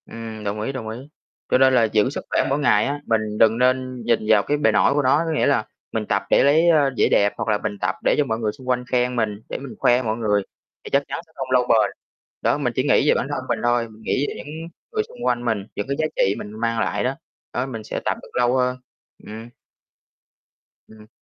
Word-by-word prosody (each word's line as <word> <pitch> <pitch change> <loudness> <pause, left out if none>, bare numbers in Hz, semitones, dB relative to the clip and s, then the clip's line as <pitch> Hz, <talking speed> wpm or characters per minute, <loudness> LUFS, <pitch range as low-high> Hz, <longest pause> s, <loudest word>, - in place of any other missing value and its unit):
Ừm, 110 -1 -8
đồng 105 +1 -3
ý, 110 - -2
đồng 125 -5 -6
ý. 110 - -5 0.5
Cho - - +4
nên 130 0 +5
là 125 -2 +5
giữ 110 +1 +2
sức 140 - -6
khỏe - - +2
mỗi 140 +2 +1
ngày 145 - +3
á, 145 +1 -2
mình 110 -1 +1 0.2
đừng 110 0 +4
nên 130 0 +1
nhìn 115 -1 +3
vào 105 -2 +5
cái 145 - 0
bề 140 -7 +3
nổi 105 +5 +3
của 145 - +2
nó, 140 +4 +3
có 165 - -2
nghĩa 155 - +1
là 135 -6 +2 0.3
mình 110 -1 -2
tập 100 -1 0
để - - +5
lấy, 160 +5 +4
a, 150 -4 +4
vẻ - - +4
đẹp, 100 0 +3
hoặc - - -3
là 105 - +3
mình 105 0 -4
tập 90 0 0
để - - +3
cho 150 - +2
mọi 110 -3 -2
người 110 -2 -1
xung 130 +4 -11
quanh 125 0 +1
khen 125 0 +1
mình, 110 -3 -1
để - - -3
mình 135 -2 -9
khoe 125 +1 +4
mọi 110 -2 -2
người 105 -3 +1 0.4
thì - - -8
chắc 140 +1 +2
chắn - - -4
sẽ 160 - -29
không 135 - -4
lâu 125 -1 +3
bền. 110 -4 +3 0.5
Đó, - - +2
mình - - -1
chỉ - - +1
nghĩ - - +3
về - - +6
bản - - -1
thân - - -3
mình - - 0
thôi, 120 -1 +1
mình 110 0 -16
nghĩ 130 +5 0
về - - -4
những - - -9 0.4
người 435 -1 0
xung 485 +2 -9
quanh 120 0 0
mình, 110 -4 0
những 105 - -3
cái 140 - -1
giá 155 - +2
trị 95 +1 +2
mình 105 - -7
mang 115 0 0
lại - - -1
đó. 130 +2 -1 0.4
Đó, 125 - -1
mình 115 -5 -6
sẽ - - -4
tập - - 0
được - - -14
lâu 125 +1 +2
hơn. 125 0 +1 0.5
Ừm. 110 +2 -9 1.4
Ừm. 110 -1 -16
120 Hz, 260 wpm, -22 LUFS, 110-130 Hz, 1.4 s, về